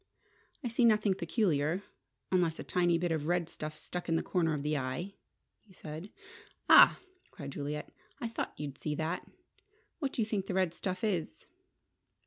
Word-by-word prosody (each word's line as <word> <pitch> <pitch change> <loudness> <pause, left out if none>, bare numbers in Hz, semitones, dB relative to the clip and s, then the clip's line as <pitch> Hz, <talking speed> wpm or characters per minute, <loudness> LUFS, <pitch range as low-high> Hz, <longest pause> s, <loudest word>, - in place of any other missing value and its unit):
"I - - -1
see 235 +1 +1
nothing 215 -3 +5
peculiar, 170 -2 +1 0.5
unless 175 -3 +2
a - - -5
tiny 175 -2 +2
bit 175 0 -1
of 155 -2 -1
red 175 -1 +1
stuff 155 -2 -6
stuck 180 -1 -5
in 165 - +3
the - - +1
corner 165 -4 +1
of 140 - -4
the 150 +1 0
eye," 140 +8 -3 0.5
he 205 - -21
said. 160 +3 -8 0.6
"Ah!" - - +9 0.3
cried 140 -2 -8
Juliet, 145 +1 -4 0.3
"I 235 - -2
thought 230 - -4
you'd 140 -2 -5
see 150 -1 -2
that! 160 +4 -2 0.7
What 280 -5 -2
do 230 - +1
you - - -1
think 205 -3 -2
the 185 - -2
red 185 -3 +2
stuff 185 +1 -4
is?" 185 -7 -1
175 Hz, 175 wpm, -32 LUFS, 155-195 Hz, 0.7 s, Ah